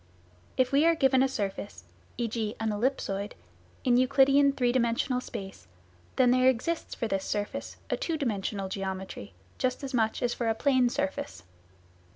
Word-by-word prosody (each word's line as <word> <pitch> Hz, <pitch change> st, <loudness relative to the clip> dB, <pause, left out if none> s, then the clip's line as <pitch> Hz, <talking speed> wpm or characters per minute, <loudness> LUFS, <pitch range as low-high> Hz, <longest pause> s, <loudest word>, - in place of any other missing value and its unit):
If 255 Hz, 0 st, +2 dB
we 280 Hz, +2 st, +4 dB
are 335 Hz, -, +4 dB
given 265 Hz, -4 st, +4 dB
a 270 Hz, -, +4 dB
surface 190 Hz, -, -4 dB, 0.3 s
(e.g. 225 Hz, -2 st, -2 dB
an 225 Hz, -1 st, 0 dB
ellipsoid) 205 Hz, -3 st, -1 dB, 0.5 s
in 245 Hz, -2 st, +4 dB
Euclidean 275 Hz, +2 st, +5 dB
three 245 Hz, -3 st, +1 dB
dimensional 250 Hz, +1 st, +1 dB
space, 195 Hz, -, -8 dB, 0.5 s
then 250 Hz, -2 st, +4 dB
there 255 Hz, +1 st, +5 dB
exists 290 Hz, +7 st, -2 dB
for 230 Hz, -, -2 dB
this 195 Hz, -2 st, -1 dB
surface 205 Hz, 0 st, -4 dB
a -, -, +3 dB
two 330 Hz, -2 st, -2 dB
dimensional 205 Hz, -7 st, -2 dB
geometry, 190 Hz, -, -5 dB, 0.2 s
just 255 Hz, +2 st, -1 dB
as 270 Hz, 0 st, -5 dB
much 220 Hz, -1 st, +1 dB
as 240 Hz, -1 st, +1 dB
for 235 Hz, -2 st, -1 dB
a 225 Hz, -, +1 dB
plane 260 Hz, 0 st, +3 dB
surface. 275 Hz, -, -3 dB
245 Hz, 160 wpm, -28 LUFS, 205-265 Hz, 0.5 s, Euclidean